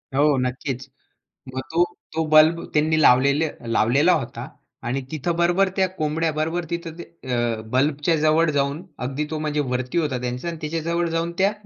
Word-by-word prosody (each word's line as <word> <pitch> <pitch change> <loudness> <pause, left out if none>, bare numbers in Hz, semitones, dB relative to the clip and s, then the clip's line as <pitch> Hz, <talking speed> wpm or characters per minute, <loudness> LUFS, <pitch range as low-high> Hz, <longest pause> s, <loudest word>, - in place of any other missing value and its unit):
हो, 145 -1 +4
नक्कीच. 125 +1 -3 0.7
मग 130 - -2
तो 170 +2 +4 0.3
तो 160 0 0
बल्ब 155 +2 +5
त्यांनी 155 +1 +2
लावलेल 140 +4 +5 0.3
लावलेला 140 +12 +4
होता 135 -7 -2 0.4
आणि 130 +3 -1
तिथं 160 +2 -2
बरोबर 175 +3 +3
त्या 190 - +3
कोंबड्या 160 -2 -1
बरोबर 160 +3 -1
तिथं 170 -1 -4
ते - - -6 0.3
अ, 120 -2 0
बल्बच्या 145 +5 +2
जवळ 155 +1 +3
जाऊन 140 +2 -1 0.2
अगदी 140 +3 -2
तो 155 - -2
म्हणजे 150 -1 -1
वरती 125 +6 -1
होता 145 -6 0
त्यांचा 125 +6 -4
आणि 165 - -4
त्याच्या 160 +2 -3
जवळ 170 +1 0
जाऊन 165 +1 -1
त्या 195 +2 +3
155 Hz, 170 wpm, -23 LUFS, 135-165 Hz, 0.7 s, बल्ब